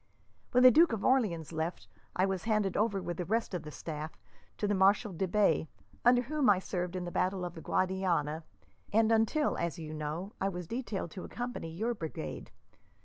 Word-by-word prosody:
When 250 +1 +4
the 255 - +10
Duke 325 +2 +5
of 215 - -2
Orleans 195 - +2
left, 160 +2 -3 0.3
I 185 - +3
was 195 -1 -2
handed 215 -4 +1
over 205 -2 +1
with 175 - -4
the 180 - -2
rest 220 +3 -1
of 180 - -2
the 150 - -8
staff 155 0 -6 0.4
to 210 - 0
the 205 - +2
Marshal 200 +2 +3
de 185 +3 -1
Bay, 200 -3 +2 0.4
under 245 0 +5
whom 285 -1 +1
I 200 - +6
served 180 -1 -3
in 180 -1 -3
the 175 - -5
battle 185 0 0
of 175 - -5
the 165 - -9
Guadiana, 175 -5 0 0.5
and 225 +1 +4
until, 225 +7 +2
as 170 -3 -2
you 155 -2 -6
know, 155 +6 -4
I 195 - +2
was 180 -2 -5
detailed 220 -5 -4
to 185 - -7
accompany 245 -8 -5
your 220 +9 -1
brigade. 160 - -6
190 Hz, 200 wpm, -31 LUFS, 170-225 Hz, 0.5 s, the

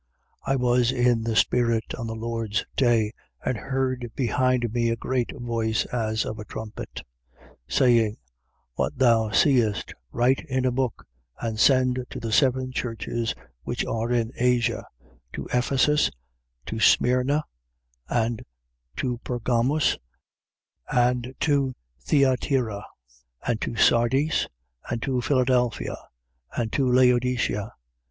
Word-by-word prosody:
1:10. - - +1
I - - +3
was 125 -1 +2
in 120 -2 +2
the 115 0 -2
spirit 115 -1 +2
on 115 -2 -5
the 110 - -4
Lord's 115 -2 -2
day 115 -5 +3 0.3
and 130 - 0
heard 130 -1 -2
behind 125 -1 +1
me 120 -1 +1
a 115 - +1
great 125 +1 -1
voice, 115 -2 -1
as 110 -2 0
of 110 - -5
a 105 - -7
trumpet, 110 0 -7 0.4
1:11. - - -22 0.2
Saying: 115 -4 +3 0.6
What - - -2
thou 115 -3 +4
seest, 110 -4 +2 0.2
write 125 +3 +2
in 130 -1 0
a 130 - +2
book 125 -1 -2 0.3
and 110 -2 -3
send 130 -1 +4
to - - -6
the 115 -2 -4
seven 130 +1 +2
churches 115 -1 -3 0.3
which - - -3
are 115 +1 -2
in 120 -1 +1
Asia: 120 -1 +1 0.5
to - - -5
Ephesus 135 +4 +3
and 70 - -10 0.5
to 110 - -4
Smyrna 125 +6 +3 0.7
and 115 -1 0 0.5
to 125 -2 -2
Pergamus 125 +4 0 0.9
and 125 +1 +1
to 140 -4 +1 0.3
Thyatira 125 - +1 0.6
and 115 -2 -1
to 115 - -3
Sardis 130 +7 +3 0.4
and 120 - -1
to 130 -3 0
Philadelphia 125 -2 +1 0.6
and 115 -2 -1
to 130 -2 +2
Laodicea. 125 -3 +2
120 Hz, 130 wpm, -25 LUFS, 115-130 Hz, 0.9 s, thou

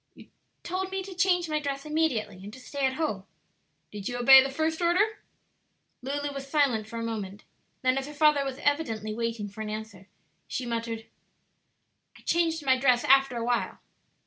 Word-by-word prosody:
"You - - -16 0.3
told 370 +2 -3
me 385 0 -3
to 385 0 -8
change 355 -1 +2
my 305 -1 0
dress 280 -1 -4
immediately 300 -11 0
and 205 - -8
to 260 - -11
stay 275 +1 -1
at 260 - -2
home." 260 -12 -2 0.7
"Did 205 0 -5
you 245 - -3
obey 265 +2 +9
the 270 - -1
first 315 +4 -1
order?" 400 +6 +2 0.8
Lulu 285 +2 -3
was 275 0 -7
silent 270 -8 +2
for 230 - -7
a 230 - -3
moment; 210 -3 -5 0.4
then 255 +1 +3
as 270 - -6
her 295 - -8
father 300 -1 +4
was 270 -1 -4
evidently 225 -8 0
waiting 230 -2 -3
for 205 +2 -9
an 215 - -4
answer, 215 -3 -7 0.4
she 255 - -4
muttered, 230 -1 -3 1.1
"I - - -18
changed 325 -3 0
my 260 -1 +3
dress 250 -2 +3
after 270 -2 +4
a 230 - -2
while." 240 0 -1
270 Hz, 185 wpm, -28 LUFS, 230-305 Hz, 1.1 s, obey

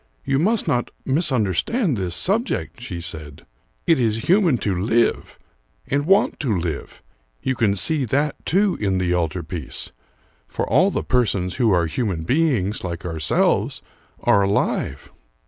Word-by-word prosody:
"You 135 - +1
must 215 +7 +1
not 120 -1 0 0.2
misunderstand 135 - +1
this 90 -4 -2
subject," 215 - -1
she 90 -8 -5
said. 80 -4 -7 0.4
"It 165 -5 +3
is 115 -2 0
human 180 - +4
to 100 -3 +1
live 115 +6 0 0.5
and 145 +2 -1
want 195 +3 +3
to 115 -9 0
live; 85 -4 -5 0.4
you 130 - +1
can 115 -5 +1
see 140 - +1
that, 140 +5 -1
too, 195 +2 +2
in 95 -2 +1
the 90 -1 0
altar 85 0 -1
piece, 80 -3 -6 0.6
for - - -3
all 190 - +4
the - - -2
persons 100 -8 0
who 120 -3 +3
are 90 -4 +3
human 90 -1 -2
beings, 120 - +1
like 85 -1 -5
ourselves, 80 -3 0 0.4
are 100 - +4
alive." 95 -7 -1
110 Hz, 145 wpm, -22 LUFS, 90-145 Hz, 0.6 s, human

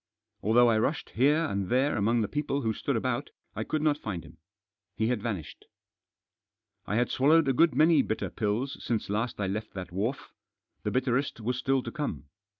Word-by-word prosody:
Although 120 +4 +5
I 110 -1 +3
rushed 150 +6 -1
here 150 +7 +3
and 100 - -2
there 130 +4 +2
among 115 +2 +2
the 105 - 0
people 145 +1 -2
who 110 -1 +1
stood - - -2
about - - -1 0.3
I - - -2
could 155 -1 -2
not 150 -1 +2
find 90 - -4
him. 80 +4 -16 0.6
He 110 +1 0
had 125 -4 0
vanished. 100 -10 -5 1.2
I 105 - -1
had 120 +2 +1
swallowed 155 +3 +4
a 135 - +3
good 160 +1 +4
many 155 +1 +5
bitter 110 - -3
pills 115 +6 -2
since 110 -4 -2
last 110 +3 -2
I 100 - 0
left 100 +3 -4
that 90 -3 -6
wharf 110 +9 -3 0.2
— - - -52
the - - 0
bitterest 130 0 0
was 125 +3 -2
still 135 -1 +1
to - - -5
come. 140 - -4
120 Hz, 195 wpm, -28 LUFS, 105-140 Hz, 1.2 s, Although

